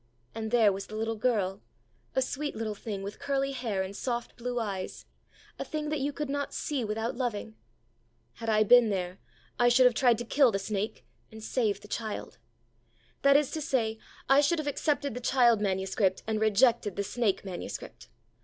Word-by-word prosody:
And 220 -1 -4
there 225 -3 +5
was 195 +1 -6
the 215 - -8
little 225 +1 -1
girl, 210 -5 0 0.5
a 265 - +3
sweet 290 +3 -4
little 220 -1 -3
thing 205 -1 -6
with 200 +1 -7
curly 275 -1 0
hair 230 -7 -2
and 190 +1 -7
soft 240 +1 -3
blue 245 0 -3
eyes, 195 -4 -4 0.5
a - - -1
thing 305 -1 -4
that 305 -1 -1
you 280 +2 -1
could 300 +1 -4
not 285 +1 -3
see 280 -5 -2
without 220 +2 -2
loving. 230 -3 -3 0.8
Had 230 -1 -5
I 215 -1 +4
been 240 +1 +6
there, 185 -2 -3 0.4
I 240 0 +5
should 255 +1 +5
have 250 - +6
tried 235 0 +4
to 240 - -5
kill 270 0 +4
the 195 - 0
snake 200 +1 -3 0.3
and 220 0 -10
save 215 -5 0
the 210 - -12
child. 215 0 -5 0.8
That 280 0 +6
is 290 -2 0
to 315 - -3
say, 225 -6 0 0.3
I 275 +1 +6
should 295 +4 +2
have 310 - -3
accepted 285 -1 0
the 250 - -4
child 240 -3 +4
manuscript, 190 -1 0
and 220 -1 -1
rejected 220 -1 +3
the 200 - -1
snake 205 -1 -1
manuscript. 185 -2 -7
225 Hz, 190 wpm, -29 LUFS, 210-260 Hz, 0.8 s, been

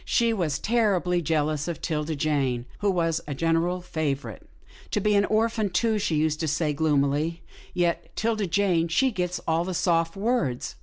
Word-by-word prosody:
She 230 -1 +2
was 165 -8 -1
terribly 190 -5 +1
jealous 155 -1 0
of 170 - -4
'Tilda 155 -1 -2
Jane 135 -5 0
who 205 - +1
was 165 -3 +1
a 145 - -3
general 165 +4 +1
favourite. 155 -5 -3 0.5
I - - +2
be 210 +1 +2
an 200 0 +4
orphan, 220 -1 +1
too," 215 +4 +1
she 195 -6 0
used 155 0 +1
to 160 - -1
say, 150 +1 0
gloomily, 150 +2 0
" - - -20
yet 170 -2 0
'Tilda 220 -3 0
Jane, 175 -2 +2
she 260 +11 +2
gits 180 -3 -2
all 165 +1 +2
the 185 0 -4
soft 165 -1 +1
words." 195 - -1
170 Hz, 175 wpm, -26 LUFS, 155-200 Hz, 0.5 s, an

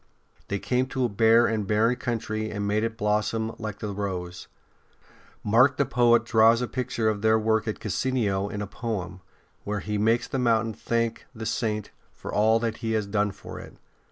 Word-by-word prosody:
They 100 - -1
came 125 +5 0
to 130 -1 -1
a - - 0
bare 115 +3 +4
and 110 -3 -1
barren 110 +4 +2
country 110 -3 -3
and 100 -1 -3
made 105 +1 +1
it 115 0 -3
blossom 110 +1 0
like 110 -3 -5
the 105 - -5
rose. 90 -3 -5 1.0
Mark 120 +6 +4
the 140 - +2
poet 120 -2 +3
draws 115 0 +5
a 125 - -2
picture 120 -3 -2
of 105 -2 0
their 110 0 +4
work 110 0 +1
at 110 - -3
Cassino 105 -3 -1
in 105 0 -4
a - - -3
poem, 95 -4 -5 0.4
where 105 -1 -3
he 105 0 -2
makes 115 +3 +2
the 135 - -2
mountain 115 -2 +2
thank 115 +2 -2
the 110 0 -6
Saint 105 -2 -2 0.2
for - - -8
all 110 +2 +4
that 115 -2 -2
he 110 -1 -2
has 110 -2 0
done 105 0 0
for 95 0 -9
it. - - -12
110 Hz, 190 wpm, -26 LUFS, 105-115 Hz, 1.0 s, draws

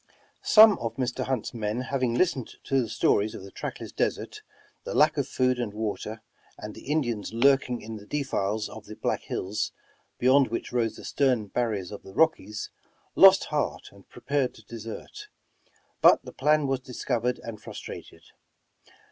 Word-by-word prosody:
Some 215 -1 +7
of 115 -1 -4
Mr. 125 -2 -2
Hunt's 130 -4 -2
men 110 +1 -2
having 130 -2 -1
listened 135 -6 0
to 135 -1 +1
the 115 - -4
stories 105 0 +1
of - - -8
the 100 - -11
trackless - - -6
desert, - - -2 0.4
the - - -5
lack - - +5
of - - -1
food 125 -1 +1
and 110 -4 -3
water, 110 0 -4 0.3
and 105 0 -7
the - - -12
Indians 120 -9 -1
lurking 130 0 +3
in 110 0 -6
the 105 0 -13
defiles 110 -7 -1
of 110 -1 -11
the 110 - -8
Black - - -1
Hills, 100 +3 -3 0.4
beyond 130 +2 +4
which 115 - -4
rose 115 -3 0
the - - -11
stern 125 -7 +1
barriers 105 -6 -2
of 105 - -8
the 95 - -13
Rockies, 135 -10 +1 0.4
lost 195 0 +8
heart 150 -1 -2
and 100 -1 -19
prepared 130 +1 -1
to 110 - -16
desert; 115 - -8 0.7
but - - +6
the - - -9
plan 150 0 +2
was 135 -1 0
discovered 125 -2 -2
and 110 -2 -7
frustrated. - - -9
120 Hz, 165 wpm, -27 LUFS, 110-135 Hz, 0.7 s, lost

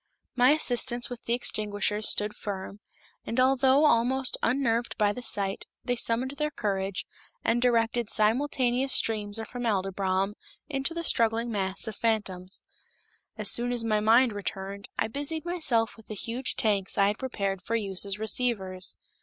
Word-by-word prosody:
My 250 0 +5
assistants 245 -5 +2
with 245 - -7
the 235 - +1
extinguishers 210 -2 0
stood 210 0 -1
firm, 200 0 -6 0.4
and 230 - -3
although 265 +2 +4
almost 260 0 +2
unnerved 235 -1 0
by 205 -1 +2
the 250 - -7
sight, 200 -5 +1 0.2
they 245 - 0
summoned 240 +2 +2
their 300 0 0
courage, 195 - -3 0.4
and 235 +1 +1
directed 235 -2 +1
simultaneous 255 +3 +2
streams 210 -2 +1
of 225 -1 -6
formaldybrom 195 -4 -1 0.3
into 275 +2 -2
the 335 - -3
struggling 230 -4 +1
mass 195 +1 0
of 220 - -5
fantoms. 200 -5 -1 0.7
As - - +2
soon 240 +1 +3
as 240 -2 -2
my 215 -2 +1
mind 230 +3 +4
returned, 200 0 -6
I - - +1
busied 290 +7 -3
myself 270 -11 +1
with 225 - -18
the 215 - -6
huge 235 +5 -2
tanks 205 -2 0
I 200 - +5
had 205 +2 0
prepared 200 -7 -3
for 230 +5 -3
use 195 -4 +1
as 200 -1 -2
receivers. 210 -5 0
225 Hz, 155 wpm, -27 LUFS, 205-250 Hz, 0.7 s, My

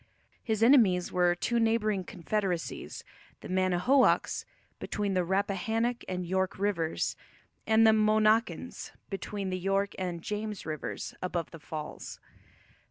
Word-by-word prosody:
His 220 -1 0
enemies 220 -9 +5
were 175 -1 +3
two 235 +6 0
neighbouring 215 -4 +1
confederacies, 180 -1 -3 0.4
the - - -8
Mannahoacs, 185 +8 +2 0.3
between 205 -1 -2
the 185 -1 +2
Rappahannock 205 +6 0
and 180 -1 -3
York 190 +1 -1
rivers, 185 -5 -1 0.5
and 220 0 +5
the 220 - +7
Monacans 215 +1 +1 0.2
between 195 0 -4
the 185 - -2
York 195 +2 0
and 175 -3 -3
James 210 -1 -4
rivers, 155 -2 -5
above 175 -3 -3
the 165 - -10
falls. 150 +1 -7
195 Hz, 120 wpm, -29 LUFS, 180-215 Hz, 0.5 s, the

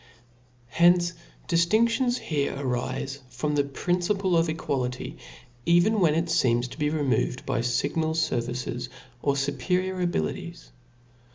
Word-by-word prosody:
Hence 175 +1 +4 0.3
difiindions 230 +9 +2
here 145 -3 -2
arile 135 +1 -3
from 130 +4 -2
the 145 -1 +3
principle 180 +6 0
of 165 0 +3
equality, 130 -5 -3 0.4
even 175 - +4
when 160 -5 +4
it 165 +1 +1
feems 120 -5 +2
to - - -10
be 150 0 +1
removed 145 -4 0
by - - 0
iignal 140 +7 0
fervices, 125 -5 -2 0.3
or 140 -1 +1
fuperior 180 +7 -1
abilities. 80 - -3
150 Hz, 115 wpm, -26 LUFS, 130-175 Hz, 0.4 s, Hence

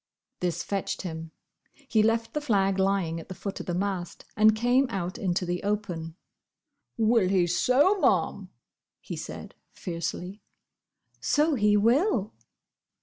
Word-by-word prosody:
This 180 -2 -1
fetched 200 -1 -3
him. 165 -2 -6 0.6
He 220 -4 +3
left 225 +1 +1
the 300 - -1
flag 195 -8 +1
lying 190 -4 +1
at 165 - -12
the 185 - -6
foot 200 +2 -5
of - - -7
the 175 - -1
mast, 185 -2 -3
and 215 0 +5
came 245 +4 +3
out 185 -4 -4
into 180 -1 0
the 175 0 -2
open. 185 -6 -3 0.8
"Will 225 -4 +3
he 185 -2 +3
so, 265 - +3
Ma'am!" - - +1 0.5
he - - -7
said, - - -8 0.2
fiercely. 180 +3 -5 0.8
"So 305 +1 +2
he 210 -5 +3
will!" 230 - +2
200 Hz, 140 wpm, -27 LUFS, 180-225 Hz, 0.8 s, and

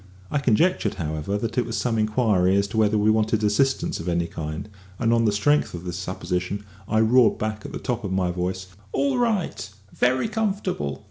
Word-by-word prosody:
I 145 - +1
conjectured, 140 - +2
however, 80 +2 -2
that 115 +3 -2
it 120 - +1
was 115 - -3
some 115 -3 0
inquiry 110 -4 +2
as 100 0 +2
to 110 - -4
whether 110 -1 +3
we 105 +1 +4
wanted 110 0 +1
assistance 135 +6 +1
of 85 - -4
any 85 0 +1
kind, 80 +1 -5 0.3
and 115 -1 +2
on 115 -1 +3
the 105 - +3
strength 105 +4 +2
of 85 - -7
this 90 -1 -4
supposition 90 +2 -3 0.2
I 110 - +2
roared 120 +2 +4
back 110 0 -3
at - - -10
the - - -4
top 120 -2 -3
of 100 - -3
my 95 -2 +1
voice: 90 +1 -3 0.3
"All 275 -3 +1
right; 215 - -1 0.3
very 130 - +2
comfortable." 195 - -2
110 Hz, 200 wpm, -24 LUFS, 90-125 Hz, 0.3 s, we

